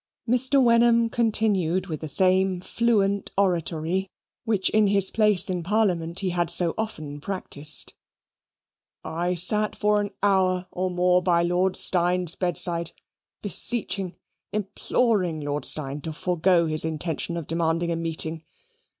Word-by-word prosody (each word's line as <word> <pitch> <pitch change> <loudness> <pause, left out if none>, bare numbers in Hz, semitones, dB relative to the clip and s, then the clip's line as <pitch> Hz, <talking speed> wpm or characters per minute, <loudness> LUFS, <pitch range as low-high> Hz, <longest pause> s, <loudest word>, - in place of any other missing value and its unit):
Mr. 255 +4 +2
Wenham 235 -1 +3
continued 205 -6 0
with 155 -5 -6
the 155 - -6
same 185 +3 +2
fluent 200 -1 0
oratory, 180 0 -1 0.4
which 210 -5 0
in 215 -1 +3
his 200 -1 +4
place 210 -4 +2
in 180 -2 -3
Parliament 180 -3 -1
he 190 -2 -2
had 175 -1 -1
so 170 -2 0
often 155 -10 -6
practised 155 -6 -1 1.1
"I 175 +3 -3
sat 210 +5 +2
for 210 0 +1
an 205 - -4
hour 185 -2 +1
or 185 +1 -3
more 180 0 +2
by 170 -1 +1
Lord 180 +2 0
Steyne's 180 -1 +1
bedside, 175 -2 0 0.5
beseeching, 205 -2 +1 0.4
imploring 205 -4 -1
Lord 145 0 -3
Steyne 145 -1 +2
to 160 +2 -6
forego 175 +1 +1
his 155 -1 +1
intention 160 +1 -3
of 165 - -5
demanding 165 +1 -1
a - - -1
meeting. 165 -1 -1
180 Hz, 135 wpm, -24 LUFS, 165-205 Hz, 1.1 s, his